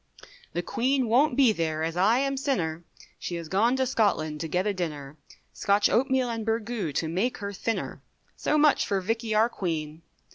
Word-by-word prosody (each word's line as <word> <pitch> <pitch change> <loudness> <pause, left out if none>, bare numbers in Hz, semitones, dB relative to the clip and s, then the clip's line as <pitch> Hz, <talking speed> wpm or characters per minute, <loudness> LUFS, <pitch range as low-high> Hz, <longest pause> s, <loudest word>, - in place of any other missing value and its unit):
The 175 - -2
Queen 260 +5 0
won't 250 +4 +3
be 265 -5 +6
there, 160 -5 -2
as 165 +1 -2
I 200 +7 +4
am 275 +1 0
sinner, 175 - -1 0.4
She 175 - -4
has 170 -1 -5
gone 220 +9 +2
to 265 0 +1
Scotland 200 -11 0
to 165 - -3
get 180 +4 0
a 210 - +1
dinner, 150 -6 -5 0.4
Scotch 200 +1 +2
oatmeal 260 +1 +2
and 230 -2 -3
burgoo, 225 -5 -2
to 160 - -1
make 190 +10 -1
her 200 -1 -5
thinner, 225 +3 -3 0.3
So 305 - 0
much 300 -1 +4
for 200 - +1
Vickey 225 +3 -2
our 220 +2 +5
Queen. 160 -7 -4
210 Hz, 185 wpm, -27 LUFS, 170-245 Hz, 0.4 s, be